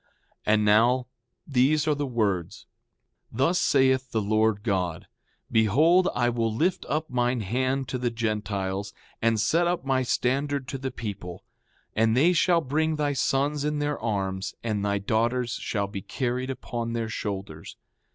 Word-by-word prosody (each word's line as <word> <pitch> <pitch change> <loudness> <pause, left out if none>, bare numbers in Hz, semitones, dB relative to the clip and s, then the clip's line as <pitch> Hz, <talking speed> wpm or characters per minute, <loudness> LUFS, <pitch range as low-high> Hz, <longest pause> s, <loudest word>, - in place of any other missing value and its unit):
6:6 - - -39 0.4
And 105 0 +3
now 120 +4 +4 0.4
these 145 +3 +2
are 155 - +4
the 145 -1 -2
words: 100 -8 -1 0.7
Thus 135 +10 +1
saith 130 -1 +3
the 115 - 0
Lord 110 0 +1
God: 90 -7 -1 0.5
Behold, 155 - +4
I 120 - +2
will 115 -2 0
lift 165 +12 0
up 155 +2 -1
mine 125 -1 +1
hand 130 +6 -1
to 130 - -2
the 125 -1 0
Gentiles, 105 -4 -3 0.3
and 115 -1 +2
set 165 +10 +2
up 175 -5 -1
my 135 -1 +2
standard 135 +2 0
to 135 - -4
the 135 0 -3
people; 95 -8 -7 0.5
and 110 +2 +3
they 165 +7 +5
shall 170 0 +3
bring 155 +3 0
thy 145 -1 0
sons 140 +2 0
in 150 0 -1
their 145 0 -1
arms, 95 -3 -2
and 105 -3 -1
thy 100 0 +1
daughters 115 +4 0
shall 100 -3 -1
be 100 0 -6
carried 125 +4 -2
upon 120 -2 -4
their 115 -1 -2
shoulders. 95 -7 -6
120 Hz, 160 wpm, -26 LUFS, 105-140 Hz, 0.7 s, they